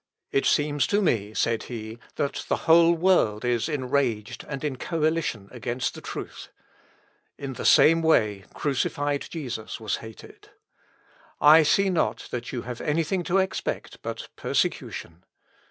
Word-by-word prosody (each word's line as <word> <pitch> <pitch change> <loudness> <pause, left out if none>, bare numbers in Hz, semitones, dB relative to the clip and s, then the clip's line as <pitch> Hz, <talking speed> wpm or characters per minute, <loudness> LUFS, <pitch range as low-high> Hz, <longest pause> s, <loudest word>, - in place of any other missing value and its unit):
"It 135 - +2
seems 145 -2 +2
to 205 - +2
me," 110 - 0
said 115 -1 +1
he, 110 -1 -7 0.2
"that 140 - -2
the - - +2
whole 165 +1 +6
world 160 - +2
is 120 +4 0
enraged, 125 -5 -1
and 140 -1 -5
in 145 -4 -2
coalition 155 - -1
against 125 0 -3
the - - -10
truth. - - -7 0.9
In 140 -1 -5
the - - -6
same 165 +1 +6
way 105 -11 +2
crucified 145 +1 -1
Jesus 125 -9 -5
was 110 -2 -2
hated. 110 -1 -13 0.9
I 155 +2 +8
see 195 +5 +3
not 175 - -1
that 120 0 -4
you 120 -3 -4
have 120 -1 -6
anything 165 +4 0
to 180 - +1
expect 190 -1 -2
but - - -6
persecution. 85 +2 -2
135 Hz, 140 wpm, -25 LUFS, 115-160 Hz, 0.9 s, I